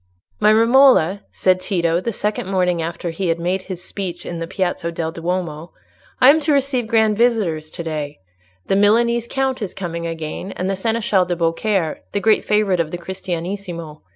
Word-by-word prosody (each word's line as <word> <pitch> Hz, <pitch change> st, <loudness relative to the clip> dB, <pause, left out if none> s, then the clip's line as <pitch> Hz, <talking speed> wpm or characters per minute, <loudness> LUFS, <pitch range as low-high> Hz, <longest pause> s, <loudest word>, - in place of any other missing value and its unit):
"My 210 Hz, 0 st, +5 dB
Romola," 230 Hz, -, +5 dB
said 185 Hz, -1 st, +2 dB
Tito, 170 Hz, -3 st, 0 dB
the 230 Hz, +6 st, -3 dB
second 210 Hz, -2 st, -2 dB
morning 180 Hz, -3 st, +1 dB
after 170 Hz, +1 st, -4 dB
he 180 Hz, +3 st, -3 dB
had 165 Hz, 0 st, 0 dB
made 180 Hz, +3 st, -1 dB
his 185 Hz, -2 st, -7 dB
speech 180 Hz, -3 st, -5 dB
in 170 Hz, -, -5 dB
the 165 Hz, -, -4 dB
Piazza 175 Hz, -2 st, -2 dB
del 165 Hz, -1 st, -3 dB
Duomo, 170 Hz, -1 st, -4 dB, 0.5 s
"I 260 Hz, -, +8 dB
am 315 Hz, -, +3 dB
to 305 Hz, 0 st, 0 dB
receive 270 Hz, -4 st, +1 dB
grand 220 Hz, -1 st, +3 dB
visitors 205 Hz, -10 st, +1 dB
to 170 Hz, -, -7 dB
day; 150 Hz, -3 st, -4 dB, 0.5 s
the 195 Hz, -, +1 dB
Milanese 235 Hz, +3 st, +3 dB
Count 265 Hz, -2 st, -1 dB
is 205 Hz, -, -4 dB
coming 170 Hz, -3 st, -4 dB
again, 165 Hz, +3 st, -5 dB
and 185 Hz, -, -3 dB
the 195 Hz, -, 0 dB
Seneschal 210 Hz, -2 st, +1 dB
de 175 Hz, 0 st, -2 dB
Beaucaire, 170 Hz, +1 st, 0 dB
the 205 Hz, -, +1 dB
great 215 Hz, +1 st, +3 dB
favourite 210 Hz, -4 st, +1 dB
of 165 Hz, -2 st, 0 dB
the 175 Hz, -, -4 dB
Cristianissimo. 175 Hz, -2 st, -5 dB
185 Hz, 180 wpm, -20 LUFS, 170-215 Hz, 0.5 s, I